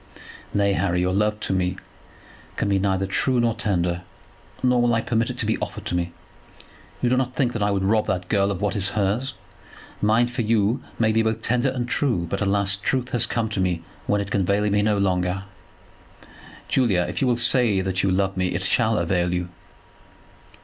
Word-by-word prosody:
"Nay, 100 -1 +2
Harry, 90 -2 0
your 90 +1 0
love 105 +2 +1
to - - -1
me 90 0 0 0.8
can - - -1
be 100 -1 +2
neither 95 0 0
true 125 +6 +1
nor 120 -1 +2
tender, 90 -5 -1 0.6
nor 125 -1 +3
will 120 -1 +3
I 115 - +1
permit 115 0 0
it 125 - -5
to 115 - 0
be 110 - 0
offered - - -5
to - - -2
me. 85 -1 -1 0.9
You 120 - +3
do - - +4
not 130 -1 -1
think 125 -3 0
I 105 -2 +1
would 100 -1 0
rob 105 +2 +2
that 90 -1 -2
girl 100 0 +2
of 100 -1 -3
what 105 +2 0
is 95 -2 -1
hers. 110 +7 0 0.7
Mine 110 +3 +4
for 120 0 -3
you 110 +2 +1 0.2
may 110 -1 +2
be 110 +1 +3
both 110 0 -1
tender 125 +2 +1
and 125 -2 -3
true; 120 -10 0
but, 100 +4 -3
alas, 100 0 +2
truth 125 +4 -1
has 120 -2 +2
come 115 -1 -1
to 105 - -3
me 90 -3 0 0.2
when 105 0 +2
it 100 -1 -6
can 100 - +1
avail 100 +3 +1
me 105 0 +3
no 105 0 +2
longer." 90 -1 0 1.2
"Julia, 100 -9 +2
if - - -4
you 135 - +2
will 120 -1 +2
say 120 -4 +3
that 95 0 -1
you 100 - +1
love 95 +1 +1
me, 90 -2 -1
it 95 - -2
shall 110 +3 +2
avail 85 0 0
you." 90 0 -2
105 Hz, 205 wpm, -23 LUFS, 95-115 Hz, 1.2 s, do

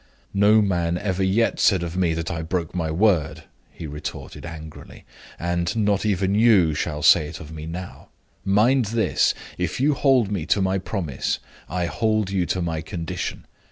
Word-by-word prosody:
"No 105 +2 +5
man 85 -3 0
ever 95 0 -2
yet 100 +5 +1
said 95 -4 +3
of 85 0 -5
me 90 -3 +1
that 80 0 -3
I 80 -1 -3
broke 85 0 -3
my 85 -3 -2
word," 90 -1 +1 0.3
he 85 - -9
retorted, 75 +3 -7
angrily; 80 -2 -10 0.3
"and 85 +3 -1
not 105 -1 +1
even 95 -1 +1
you 105 -7 +5
shall 75 -1 -3
say 75 - +6
it 80 +2 -8
of 80 0 -10
me 80 0 -7
now. 90 +2 -8 0.3
Mind 110 +6 +3
this! 110 +2 +1 0.2
If - - -2
you 145 +3 +3
hold 130 -7 +3
me 90 -6 -2
to - - +2
my 95 0 +1
promise, 90 - -2 0.3
I 90 +1 -1
hold 110 +1 0
you 90 -3 0
to 90 - -1
my 80 -2 -2
condition. 85 -3 -5
90 Hz, 175 wpm, -23 LUFS, 80-105 Hz, 0.3 s, say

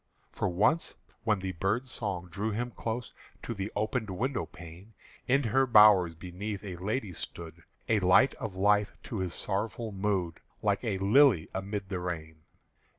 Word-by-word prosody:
For 105 - -1
once, 105 - +2 0.3
when 105 -4 +2
the 95 0 -2
bird's 105 +9 -1
song 95 -5 -3
drew 105 +5 -2
him 120 +3 -2
close 115 +1 -4 0.3
To 115 - -3
the 100 0 -4
opened 110 +1 -1
window 120 +7 -2
pane, 90 +6 -13 0.3
In 135 +3 +3
her 130 +3 +2
bowers 105 -7 +7
beneath 95 +4 -6
a 95 -3 -6
lady 105 +2 -2
stood, 85 0 -7 0.3
A 110 -2 +3
light 95 +8 +5
of 105 -4 -5
life 105 +2 +3
to 110 - -5
his 90 -2 -2
sorrowful 110 +3 -2
mood, 95 -4 -1 0.2
Like 100 0 +1
a 105 -5 -1
lily 100 - +4
amid 100 +1 -4
the 95 -3 -2
rain. 80 -3 -5
100 Hz, 160 wpm, -30 LUFS, 90-110 Hz, 0.3 s, bowers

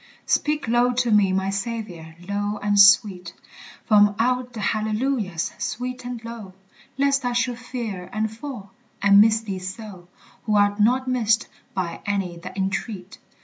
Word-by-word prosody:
Speak 295 -3 0
low 240 +2 +3
to 245 -1 0
me, 205 -3 +4
my 190 +1 0
Saviour, 195 -6 -5
low 205 +1 -2
and 205 0 +2
sweet 200 -3 +5 0.5
From 205 -1 +5
out 250 +1 0
the 225 - -7
hallelujahs, 215 -4 -1
sweet 250 +2 -4
and 245 -1 -5
low, 220 -5 -9 0.4
Lest 275 0 +2
I 245 0 -1
should 245 0 -1
fear 230 -8 -6
and 220 +1 -2
fall, 230 -6 -8 0.3
and 200 0 +6
miss 220 +1 +4
thee 195 -4 -5
so 185 -1 -8 0.4
Who 215 -2 +1
art 205 0 +3
not 250 +5 +2
missed 230 -3 +1 0.3
by 180 -3 -3
any 195 -4 -2
that 170 +3 -9
entreat. 190 0 -4
215 Hz, 150 wpm, -23 LUFS, 195-240 Hz, 0.5 s, and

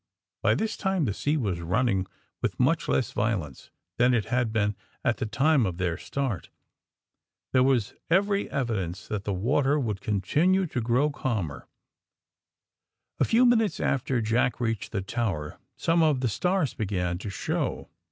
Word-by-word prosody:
By - - +3
this 220 0 -2
time 190 -5 0
the 105 - 0
sea 145 +9 0
was 100 - -1
running 95 +1 +1 0.3
with - - -2
much - - +2
less - - +1
violence 95 - -2 0.3
than 125 +1 +4
it 110 - 0
had 125 -2 +1
been 105 -2 +1 0.3
at - - +2
the - - -2
time 135 +5 +3
of 90 -2 -4
their 90 -3 0
start. 130 - -3 1.0
There 130 - +5
was 125 -5 +2 0.2
every 200 +3 +2
evidence 105 - -2
that 105 -2 -3
the 105 - -1
water 135 +9 +2
would 105 -7 -2
continue 155 - +2
to 135 -7 -3
grow 125 +6 +2
calmer. 95 - -3 1.5
A - - +4
few 235 +3 +4
minutes 225 -4 +3
after 130 -2 0
Jack 115 +2 +1
reached 115 -4 -2
the 100 -4 -2
tower 95 -9 -3 0.2
some 165 0 +2
of 150 -5 +3
the 125 - +1
stars 180 - 0
began 90 -4 -2
to 105 - -5
show. 100 - -2
120 Hz, 160 wpm, -27 LUFS, 100-145 Hz, 1.5 s, There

